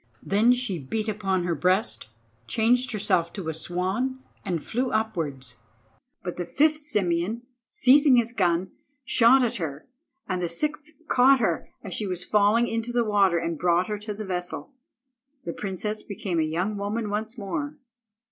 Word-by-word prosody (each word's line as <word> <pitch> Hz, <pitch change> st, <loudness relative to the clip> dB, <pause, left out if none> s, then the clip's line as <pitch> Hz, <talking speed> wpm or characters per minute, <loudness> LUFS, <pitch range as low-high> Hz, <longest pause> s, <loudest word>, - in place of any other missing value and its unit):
Then 215 Hz, +5 st, +4 dB
she 245 Hz, -8 st, 0 dB
beat 215 Hz, +11 st, -3 dB
upon 195 Hz, -4 st, 0 dB
her 175 Hz, -1 st, 0 dB
breast, 185 Hz, -, 0 dB, 0.4 s
changed 245 Hz, +3 st, +2 dB
herself 195 Hz, -6 st, +1 dB
to 185 Hz, -6 st, -4 dB
a -, -, -2 dB
swan, 185 Hz, +11 st, -2 dB, 0.3 s
and 170 Hz, -4 st, -3 dB
flew 250 Hz, +3 st, -1 dB
upwards; 150 Hz, -, -2 dB, 0.7 s
but 180 Hz, -, -5 dB
the 175 Hz, -, -2 dB
fifth 305 Hz, +1 st, +2 dB
Simeon, 210 Hz, -, -1 dB, 0.3 s
seizing 285 Hz, -7 st, +5 dB
his 235 Hz, -1 st, +2 dB
gun, 180 Hz, -3 st, +1 dB, 0.3 s
shot 250 Hz, +3 st, +5 dB
at 235 Hz, 0 st, -2 dB
her, 155 Hz, -5 st, -5 dB, 0.4 s
and 185 Hz, -2 st, -2 dB
the 175 Hz, -, -1 dB
sixth 300 Hz, -, -3 dB
caught 265 Hz, +2 st, +5 dB
her 230 Hz, -, 0 dB
as 195 Hz, -4 st, -6 dB
she 210 Hz, -, -2 dB
was 180 Hz, -1 st, -3 dB
falling 210 Hz, +4 st, +3 dB
into 230 Hz, +1 st, -2 dB
the 240 Hz, -1 st, +1 dB
water 200 Hz, -4 st, +3 dB
and 165 Hz, -2 st, -2 dB
brought 175 Hz, +1 st, +2 dB
her 210 Hz, -1 st, -2 dB
to 210 Hz, 0 st, -5 dB
the 215 Hz, +1 st, -6 dB
vessel. 180 Hz, +8 st, -5 dB, 0.7 s
The 170 Hz, -, -3 dB
princess 210 Hz, +2 st, -4 dB
became 190 Hz, -4 st, -3 dB
a 155 Hz, -1 st, 0 dB
young 185 Hz, +6 st, -1 dB
woman 205 Hz, +2 st, -2 dB
once 220 Hz, +3 st, -3 dB
more. 290 Hz, +9 st, -4 dB
205 Hz, 165 wpm, -26 LUFS, 180-235 Hz, 0.7 s, seizing